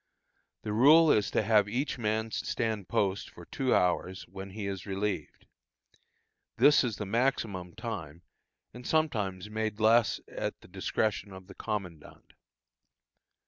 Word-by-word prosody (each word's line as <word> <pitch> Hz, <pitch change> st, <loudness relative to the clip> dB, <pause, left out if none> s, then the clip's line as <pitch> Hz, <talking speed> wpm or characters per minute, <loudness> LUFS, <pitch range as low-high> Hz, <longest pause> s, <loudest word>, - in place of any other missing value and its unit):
The 105 Hz, -, -3 dB
rule 150 Hz, +8 st, +7 dB
is 105 Hz, -, +2 dB
to -, -, +1 dB
have 105 Hz, -2 st, +3 dB
each 125 Hz, +4 st, -2 dB
man 110 Hz, 0 st, -1 dB
stand 110 Hz, -5 st, -2 dB
post 100 Hz, 0 st, 0 dB
for 85 Hz, -, -13 dB
two 130 Hz, +6 st, 0 dB
hours, 90 Hz, +1 st, 0 dB
when 95 Hz, +2 st, -8 dB
he 100 Hz, +1 st, -6 dB
is 100 Hz, 0 st, -5 dB
relieved. 100 Hz, +1 st, -3 dB, 1.1 s
This 145 Hz, -1 st, +6 dB
is 120 Hz, -4 st, -1 dB
the 105 Hz, -, -5 dB
maximum 100 Hz, -5 st, -1 dB
time, 85 Hz, -9 st, -6 dB, 0.5 s
and 125 Hz, -, -10 dB
is -, -, -6 dB
sometimes 105 Hz, -, 0 dB
made 110 Hz, -1 st, -2 dB
less 110 Hz, +1 st, +4 dB
at -, -, -4 dB
the -, -, -15 dB
discretion 105 Hz, -1 st, -2 dB
of 95 Hz, 0 st, -11 dB
the 95 Hz, -, -12 dB
commandant. 95 Hz, -8 st, -6 dB
105 Hz, 140 wpm, -30 LUFS, 95-115 Hz, 1.1 s, rule